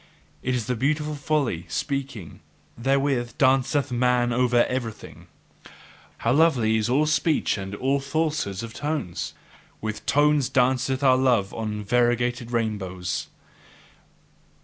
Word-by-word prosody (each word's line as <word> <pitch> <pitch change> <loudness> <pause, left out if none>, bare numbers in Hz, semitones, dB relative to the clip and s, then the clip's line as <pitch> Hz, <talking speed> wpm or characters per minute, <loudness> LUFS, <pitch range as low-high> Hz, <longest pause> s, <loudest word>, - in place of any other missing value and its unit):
It 130 0 -1
is 115 -3 -3
a 125 - 0
beautiful 150 +5 0
folly, 140 - -1
speaking; 135 - -4 0.4
therewith 135 -1 0
danceth 135 +1 +2
man 125 0 +2
over 120 -1 +3
everything. 120 -4 -6 0.9
How 115 - 0
lovely 130 -8 +3
is 110 +1 -1
all 140 +5 +3
speech 155 +1 +1
and 95 0 -5
all 135 +5 0
falsehoods 140 -8 -2
of 115 0 -7
tones! 140 - -3 0.4
With 110 -1 -5
tones 145 -2 +3
danceth 130 +1 +1
our 130 -2 +5
love 120 -7 +2
on 105 -2 -4
variegated 120 +1 +1
rainbows. 95 -9 -2
125 Hz, 120 wpm, -24 LUFS, 110-140 Hz, 0.9 s, our